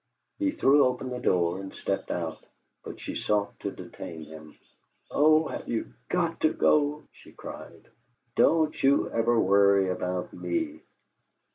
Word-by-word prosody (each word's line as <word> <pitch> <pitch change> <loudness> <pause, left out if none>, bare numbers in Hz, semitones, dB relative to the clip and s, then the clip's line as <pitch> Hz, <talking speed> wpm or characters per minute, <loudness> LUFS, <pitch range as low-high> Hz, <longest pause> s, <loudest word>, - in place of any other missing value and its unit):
He 300 -1 +2
threw 145 - +4
open 125 0 -1
the 125 - -4
door 90 -2 +1
and 95 0 -7
stepped 100 - -3
out, 80 -3 -4 0.4
but - - -9
she - - -6
sought 100 -1 -1
to - - -3
detain 80 -1 -9
him. 80 0 -13 0.5
"Oh, 155 +2 +4
have - - -6
you 115 - -3 0.2
GOT 170 -2 0
to 155 - +2
go?" 150 0 +2
she - - -17
cried. - - -10 0.5
"Don't 160 -1 +3
you 140 +1 +3
ever 115 0 +2
worry 100 -1 +4
about 90 0 -3
me." 320 -2 -3
115 Hz, 145 wpm, -27 LUFS, 95-155 Hz, 0.5 s, threw